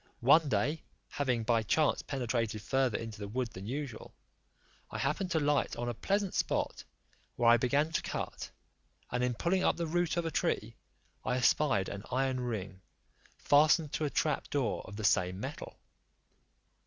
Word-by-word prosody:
One 145 Hz, +5 st, +5 dB
day, 150 Hz, +3 st, 0 dB, 0.3 s
having 125 Hz, -5 st, -1 dB
by 115 Hz, 0 st, +2 dB
chance 150 Hz, +7 st, +2 dB
penetrated 115 Hz, -5 st, -2 dB
farther 135 Hz, -4 st, +1 dB
into 110 Hz, -2 st, -7 dB
the 100 Hz, -, -5 dB
wood 120 Hz, +3 st, -2 dB
than 95 Hz, -1 st, -9 dB
usual, 135 Hz, -2 st, -5 dB, 0.7 s
I -, -, -5 dB
happened 155 Hz, +7 st, -1 dB
to 165 Hz, -, +1 dB
light 145 Hz, -1 st, +1 dB
on 120 Hz, -, -3 dB
a 120 Hz, -, -1 dB
pleasant 195 Hz, -, -1 dB
spot, -, -, -1 dB, 0.5 s
where 120 Hz, -, +2 dB
I 120 Hz, -, +7 dB
began 140 Hz, +6 st, +1 dB
to -, -, 0 dB
cut; -, -, -5 dB, 0.6 s
and 125 Hz, +1 st, 0 dB
in 125 Hz, -1 st, 0 dB
pulling 185 Hz, +8 st, +1 dB
up -, -, +2 dB
the 170 Hz, -, -1 dB
root 175 Hz, +1 st, 0 dB
of 170 Hz, -, 0 dB
a 165 Hz, -, -2 dB
tree, -, -, -1 dB, 0.5 s
I 125 Hz, -, 0 dB
espied 125 Hz, -5 st, +2 dB
an 100 Hz, -, -5 dB
iron 130 Hz, 0 st, 0 dB
ring, 100 Hz, -6 st, -4 dB, 0.6 s
fastened 150 Hz, +1 st, +4 dB
to 155 Hz, -, 0 dB
a -, -, 0 dB
trap 150 Hz, +1 st, -1 dB
door 140 Hz, -4 st, 0 dB
of 100 Hz, -, -9 dB
the 110 Hz, -, -6 dB
same 90 Hz, -2 st, +2 dB
metal. -, -, -7 dB
130 Hz, 170 wpm, -32 LUFS, 115-150 Hz, 0.7 s, I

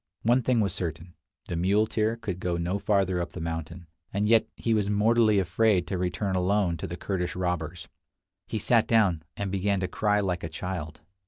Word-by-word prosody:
One 120 Hz, +3 st, +4 dB
thing 120 Hz, -2 st, +2 dB
was 100 Hz, -4 st, 0 dB
certain, 85 Hz, -2 st, -4 dB, 0.3 s
the 85 Hz, -, -3 dB
muleteer 105 Hz, +5 st, +1 dB
could 90 Hz, -6 st, -5 dB
go 90 Hz, -1 st, -1 dB
no 90 Hz, +4 st, -1 dB
farther 95 Hz, -3 st, +1 dB
up 85 Hz, -, -5 dB
the -, -, -6 dB
mountain, 80 Hz, +1 st, -5 dB, 0.3 s
and 100 Hz, +1 st, 0 dB
yet 115 Hz, 0 st, +4 dB
he 115 Hz, -, 0 dB
was 105 Hz, -2 st, +1 dB
mortally 110 Hz, +1 st, +3 dB
afraid 95 Hz, 0 st, +2 dB
to 95 Hz, -, -3 dB
return 90 Hz, +2 st, -1 dB
alone 95 Hz, -1 st, +1 dB
to 95 Hz, -, -5 dB
the 85 Hz, 0 st, -6 dB
Kurdish 90 Hz, -3 st, -3 dB
robbers. 90 Hz, -2 st, -3 dB, 0.6 s
He -, -, -3 dB
sat 115 Hz, +1 st, +3 dB
down, 100 Hz, -8 st, +3 dB, 0.2 s
and 100 Hz, -2 st, -3 dB
began 100 Hz, 0 st, 0 dB
to 90 Hz, -, 0 dB
cry 105 Hz, +2 st, +1 dB
like 90 Hz, -4 st, -1 dB
a 80 Hz, -, -3 dB
child. 85 Hz, -2 st, -5 dB
95 Hz, 190 wpm, -27 LUFS, 90-105 Hz, 0.6 s, One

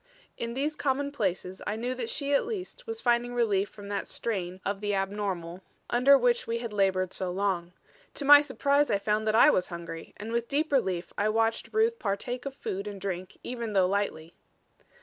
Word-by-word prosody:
In 235 Hz, 0 st, -4 dB
these 295 Hz, +3 st, -1 dB
commonplaces 260 Hz, -11 st, -1 dB
I 210 Hz, -, -1 dB
knew 245 Hz, +3 st, -2 dB
that 245 Hz, -3 st, -4 dB
she 285 Hz, -1 st, -1 dB
at 280 Hz, -, +3 dB
least 455 Hz, +3 st, -6 dB
was 450 Hz, 0 st, -4 dB
finding 240 Hz, 0 st, +1 dB
relief 205 Hz, -4 st, +2 dB
from 205 Hz, -1 st, -11 dB
that 205 Hz, -, -2 dB
strain 185 Hz, -5 st, -3 dB
of 200 Hz, 0 st, -2 dB
the 205 Hz, -1 st, 0 dB
abnormal 195 Hz, -3 st, -3 dB, 0.3 s
under 260 Hz, +4 st, +6 dB
which 245 Hz, -2 st, +2 dB
we 230 Hz, 0 st, 0 dB
had 235 Hz, -2 st, -5 dB
labored 190 Hz, -2 st, +1 dB
so 185 Hz, -, -2 dB
long. 180 Hz, -2 st, -1 dB, 0.4 s
To 285 Hz, -, -4 dB
my 290 Hz, +1 st, +10 dB
surprise 285 Hz, 0 st, +1 dB
I -, -, +3 dB
found 210 Hz, +2 st, 0 dB
that 215 Hz, -, +2 dB
I 275 Hz, +6 st, +8 dB
was 180 Hz, -, +1 dB
hungry, 170 Hz, -1 st, -8 dB
and 215 Hz, +2 st, -6 dB
with 235 Hz, 0 st, -1 dB
deep 300 Hz, +3 st, 0 dB
relief 185 Hz, -10 st, 0 dB
I 210 Hz, +1 st, +2 dB
watched 225 Hz, +1 st, +1 dB
Ruth 450 Hz, +2 st, +2 dB
partake 245 Hz, +6 st, -3 dB
of 270 Hz, -, -6 dB
food 195 Hz, -5 st, -4 dB
and 200 Hz, -1 st, -6 dB
drink 185 Hz, -1 st, -5 dB
even 235 Hz, -3 st, -4 dB
though 190 Hz, -2 st, +4 dB
lightly. 180 Hz, -5 st, -2 dB
215 Hz, 195 wpm, -28 LUFS, 195-260 Hz, 0.4 s, my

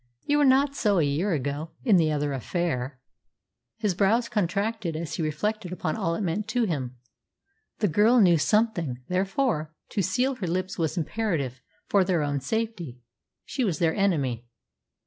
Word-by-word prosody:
"You 290 Hz, 0 st, +2 dB
were 290 Hz, -, +5 dB
not 275 Hz, +1 st, +4 dB
so 205 Hz, -7 st, +2 dB
a 165 Hz, -, +4 dB
year 150 Hz, +8 st, 0 dB
ago 145 Hz, +2 st, -3 dB
in 220 Hz, -7 st, +5 dB
the 160 Hz, -2 st, +3 dB
other 145 Hz, -1 st, -1 dB
affair." 135 Hz, -2 st, -2 dB, 0.8 s
His 210 Hz, -4 st, 0 dB
brows 215 Hz, +6 st, +2 dB
contracted 200 Hz, -1 st, -1 dB
as 160 Hz, -1 st, -4 dB
he -, -, -2 dB
reflected 180 Hz, +6 st, -2 dB
upon 160 Hz, -3 st, -2 dB
all 165 Hz, 0 st, -1 dB
it 205 Hz, -, -3 dB
meant 195 Hz, +4 st, -2 dB
to 245 Hz, +2 st, +1 dB
him. 130 Hz, -, -2 dB, 0.8 s
The 210 Hz, -, +1 dB
girl 210 Hz, +8 st, +4 dB
knew 175 Hz, -6 st, +5 dB
something; 170 Hz, -, +1 dB
therefore, 185 Hz, -, 0 dB
to 205 Hz, -, -1 dB
seal 245 Hz, +9 st, +1 dB
her 190 Hz, -, -3 dB
lips 185 Hz, +2 st, -2 dB
was 160 Hz, 0 st, -1 dB
imperative 160 Hz, -, -2 dB, 0.2 s
for 200 Hz, -2 st, +3 dB
their 180 Hz, -4 st, +1 dB
own 145 Hz, -1 st, -1 dB
safety. 180 Hz, -, -3 dB, 0.5 s
She 265 Hz, -, -2 dB
was 185 Hz, -9 st, 0 dB
their 160 Hz, -1 st, +2 dB
enemy. 140 Hz, -, 0 dB
180 Hz, 165 wpm, -26 LUFS, 150-215 Hz, 0.8 s, were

